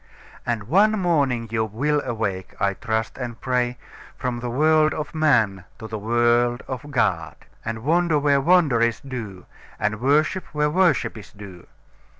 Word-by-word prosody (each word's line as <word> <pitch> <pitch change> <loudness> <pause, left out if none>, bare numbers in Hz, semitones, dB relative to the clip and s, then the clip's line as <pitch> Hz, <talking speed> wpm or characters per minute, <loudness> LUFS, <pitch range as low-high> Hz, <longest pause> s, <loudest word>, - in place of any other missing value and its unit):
And 115 -3 -1
one 200 - +3
morning 145 - +1
you 110 -1 +1
will 140 +8 0
awake, 105 -6 -3
I 100 0 +1
trust 110 +1 -3
and 120 -2 -5
pray, 125 -1 -1 0.4
from 125 -2 -3
the 120 0 -4
world 155 +4 +3
of 150 - -5
man 110 - +2
to 110 - -8
the 110 -1 -5
world 120 +2 +2
of 130 +3 -6
God, 135 -5 0 0.3
and 110 0 -5
wonder 165 +1 +2
where 140 -1 +2
wonder 155 -7 +3
is 115 -1 +1
due, 110 -9 -7 0.3
and 105 +1 -1
worship 155 +7 +2
where 150 0 +1
worship 170 -9 +1
is 105 - -14
due. 100 -4 -12
125 Hz, 155 wpm, -23 LUFS, 110-150 Hz, 0.4 s, one